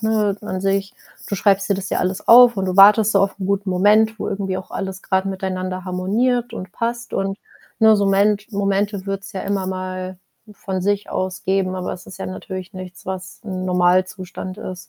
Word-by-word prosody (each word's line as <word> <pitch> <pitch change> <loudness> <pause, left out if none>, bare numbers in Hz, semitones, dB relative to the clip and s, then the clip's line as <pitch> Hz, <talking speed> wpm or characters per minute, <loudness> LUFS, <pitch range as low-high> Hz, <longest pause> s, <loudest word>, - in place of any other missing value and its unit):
ne, 215 -2 +1
an 190 -3 -5
sich, 195 0 0 0.3
du 200 - -1
schreibst 195 0 +2
dir 200 - +2
das 195 0 -5
ja - - 0
alles 185 +1 -2
auf 240 -1 +8
und 190 - -1
du 185 -1 -1
wartest 210 +2 +7
so 195 - +4
auf 195 0 0
'n 190 - -4
guten 200 0 -1
Moment, 210 +4 +3
wo - - -3
irgendwie 195 -1 -2
auch 185 - -8
alles 190 -1 -5
grad 190 0 0
miteinander 185 -1 -3
harmoniert 230 +7 0
und 185 0 -7
passt. 235 +1 -3
Und, 195 0 -1 0.4
ne, 220 -1 +7
so 200 -1 +1
ment 200 +1 +2
Momente 200 -1 -1
wird's 195 0 -5
ja 190 - -4
immer 195 -1 -2
mal 185 0 -5 0.4
von 190 -2 -4
sich 205 +1 -1
aus 185 0 -3
geben, 190 -1 0
aber 180 -1 -3
es 180 - -10
ist - - -10
ja - - -5
natürlich 185 0 -7
nichts, 185 -1 -10
was 185 0 -6
'n 185 -3 -4
Normalzustand 185 +1 0
ist. 185 -4 -8
195 Hz, 200 wpm, -20 LUFS, 185-205 Hz, 0.4 s, auf